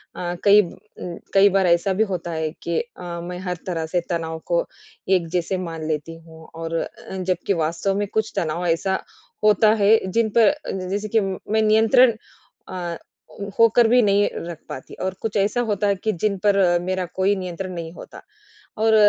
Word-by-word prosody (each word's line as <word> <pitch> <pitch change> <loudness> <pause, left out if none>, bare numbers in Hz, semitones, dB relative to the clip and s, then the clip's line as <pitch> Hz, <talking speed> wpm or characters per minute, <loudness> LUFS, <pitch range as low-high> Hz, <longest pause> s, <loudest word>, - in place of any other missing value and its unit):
अ, 175 0 -3
कई 205 0 +7
उम, 180 -1 -9 0.2
कई 200 +1 +6
बार 190 -1 +2
ऐसा 170 +3 +3
भी - - +7
होता 175 -1 -4
है 160 -1 -2
कि 170 -1 0
अ, 180 -7 -7
मैं 180 +1 -6
हर 180 -1 -2
तरह 165 -3 -2
से 175 - +3
तनाव 160 -2 -3
को - - +1 0.5
एक 170 - -5
जैसे 180 +2 -1
मान 160 -1 -6
लेती 155 +1 -3
हूँ 160 0 -14
और 165 0 -4
अ, - - -8
जबकि 185 +1 -1
वास्तव 170 +5 -1
में 205 - -1
कुछ 220 0 0
तनाव 170 -1 -1
ऐसा 190 +3 0 0.4
होता 215 0 +5
है 210 +3 +7 0.2
जिन 230 +2 +2
पर 235 +5 +6 0.4
जैसे 205 +2 -2
कि - - +5
मैं 195 +3 -1
नियंत्रण 225 +3 +5 0.6
अ, 175 -2 -4 0.6
होकर 230 +1 +6
भी 245 +2 +5
नहीं 205 -1 +3 0.2
रख 170 -2 -6
पाती 130 - -8
और 190 0 -1
कुछ 220 -2 -2
ऐसा 205 +4 +1
होता 205 0 +1
है 200 - +2
कि 220 - +2
जिन 205 -2 +1
पर 205 -1 +4
अ, 175 -3 +4
मेरा 185 +1 -2
कोई 190 +2 +2
नियंत्रण 185 0 -5
नहीं 165 -2 -6
होता - - -11 0.6
और 220 0 +4
190 Hz, 185 wpm, -22 LUFS, 170-210 Hz, 0.6 s, कई